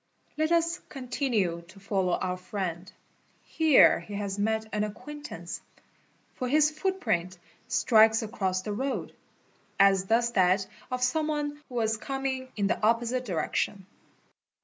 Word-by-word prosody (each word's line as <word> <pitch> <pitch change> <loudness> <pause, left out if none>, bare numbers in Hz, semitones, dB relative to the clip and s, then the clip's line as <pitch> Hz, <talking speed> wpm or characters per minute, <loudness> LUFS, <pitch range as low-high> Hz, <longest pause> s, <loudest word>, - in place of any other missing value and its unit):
* - - -38
Let 315 +1 +1
us 335 +1 +2
continue 240 - -1
to 195 +3 -15
follow 190 -2 0
our 180 +1 -1
friend. 185 -1 -5 0.5
Here 315 -4 +5
he 205 - -8
has 200 -1 -3
met 220 +1 0
an 210 - 0
acquain= 255 +8 -5
_ - - -18
tance—for 255 -3 -9
his 300 +2 +4
footprint 305 - -1 0.3
strikes 225 -2 +4
across 190 -4 -2
the 210 - -3
road, 265 +6 -3 0.7
as 195 -1 +5
does 235 +3 +2
that 190 -2 +3 0.2
of 250 0 -2
some 305 +5 +1
one 295 -1 -2
who 250 - -9
was 220 -2 +1
coming 265 +1 -3
in 205 - 0
the 200 - 0
opposite 235 +3 +1
direction. 190 +1 -2
220 Hz, 145 wpm, -28 LUFS, 195-270 Hz, 0.7 s, Here